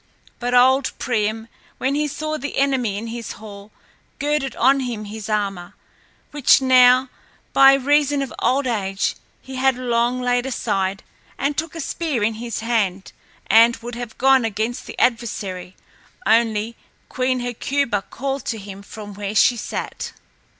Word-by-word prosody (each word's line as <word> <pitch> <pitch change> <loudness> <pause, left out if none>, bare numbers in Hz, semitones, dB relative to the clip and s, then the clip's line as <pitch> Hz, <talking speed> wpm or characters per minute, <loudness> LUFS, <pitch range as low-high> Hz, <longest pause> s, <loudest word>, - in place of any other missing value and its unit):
But 245 0 -1
old 260 +2 +4
Priam, 220 -2 -1 0.3
when 265 +2 0
he 300 +1 0
saw 310 +2 -4
the 285 - -5
enemy 260 -7 +1
in 220 - -5
his 230 0 -6
hall, 205 -1 -11 0.5
girded 290 -3 -1
on 270 +3 +4
him 235 -5 -4
his 215 0 -7
armor, 195 -4 -2 0.6
which 290 -2 +5
now 255 0 +5 0.4
by 270 0 +8
reason 285 +1 +2
of 270 - -7
old 275 +2 +1
age 195 -5 -1 0.3
he 265 0 -8
had 265 0 +3
long 245 0 0
laid 245 0 0
aside, 195 -6 -2 0.3
and 285 +1 -1
took 320 +2 -3
a - - -6
spear 305 -6 -2
in 220 +2 +1
his 235 -2 -4
hand 205 -5 -1 0.3
and 230 +2 +6
would 240 +1 -8
have 235 -1 -7
gone 265 -1 +4
against 220 +2 -3
the - - -9
adversary, 200 -6 -1 0.5
only 225 0 +2 0.3
Queen 255 0 -1
Hecuba 245 -1 -1
called 270 +5 -4
to 225 - -2
him 200 -1 -9
from 205 0 -10
where 205 +1 -5
she 245 - +5
sat. 230 - -5
240 Hz, 150 wpm, -21 LUFS, 215-265 Hz, 0.6 s, by